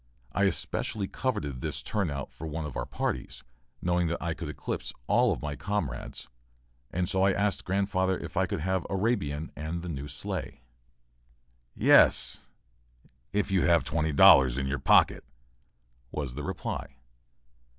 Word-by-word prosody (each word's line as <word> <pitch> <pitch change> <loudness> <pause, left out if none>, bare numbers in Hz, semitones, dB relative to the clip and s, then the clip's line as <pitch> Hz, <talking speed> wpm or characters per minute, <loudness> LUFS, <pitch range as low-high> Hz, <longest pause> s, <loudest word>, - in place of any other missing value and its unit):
I 100 +6 +2
especially 100 +1 -1
coveted 75 - -3
this 75 -3 -2
turnout 75 -11 -2
for 80 - -8
one 80 +1 -4
of 75 - -7
our - - -3
parties, - - -3 0.4
knowing 90 -1 +2
that 85 - -2
I 85 -1 -2
could - - -6
eclipse - - -4
all - - +3
my 75 -1 -4
comrades, 85 -11 -4 0.6
and 90 0 -1
so 95 - +2
I 95 0 +4
asked 100 0 0
grandfather 95 -1 +1
if - - -8
I - - +2
could - - -3
have 95 +2 0
"Arabian" 95 -8 -1
and 80 +3 -4
the 90 - -5
new 70 -2 -5
sleigh. 70 -3 -6 1.1
"Yes, - - +5 0.9
if 105 0 0
you 95 -2 +3
have 85 -2 +4
twenty 80 +1 -1
dollars 65 -3 +7
in 70 - -1
your 70 +1 -2
pocket," - - +4 0.9
was 70 -5 -4
the 75 - -5
reply. - - -5
85 Hz, 150 wpm, -28 LUFS, 75-95 Hz, 1.1 s, dollars